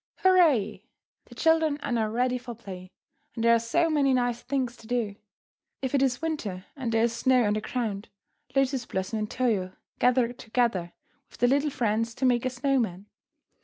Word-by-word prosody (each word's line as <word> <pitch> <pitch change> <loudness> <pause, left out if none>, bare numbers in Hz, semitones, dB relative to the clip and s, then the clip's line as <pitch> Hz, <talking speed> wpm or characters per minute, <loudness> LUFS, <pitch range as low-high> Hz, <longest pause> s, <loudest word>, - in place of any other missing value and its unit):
Hurrah! 300 - +4 0.5
The - - -15
children 320 -2 +3
are - - -3
now 225 -2 +1
ready 250 +3 0
for 240 -1 -8
play, 185 -4 -9 0.5
and 230 - -3
there 235 0 +6
are 230 - +4
so 235 +10 +1
many 285 -4 +2
nice 245 -1 0
things 255 -2 -2
to 225 - -15
do. 230 -4 -1 0.7
If 265 - -2
it 275 - +3
is 260 +1 +1
winter 215 - -3
and 260 -5 -3
there 225 0 +2
is 235 0 +1
snow 255 +1 +3
on 210 -1 +2
the 215 - -1
ground, 215 -3 -3 0.5
Lotus 270 -2 +1
Blossom 190 +4 -3
and 210 0 -3
Toyo 205 -8 0 0.3
gather 245 -1 +3
together 220 -7 -1 0.4
with - - -16
their 245 - +3
little 285 +3 +2
friends 230 -3 -1
to 265 - -1
make 245 -1 +2
a - - 0
snow 270 +2 0
man. 195 -4 -3
240 Hz, 190 wpm, -27 LUFS, 220-260 Hz, 0.7 s, there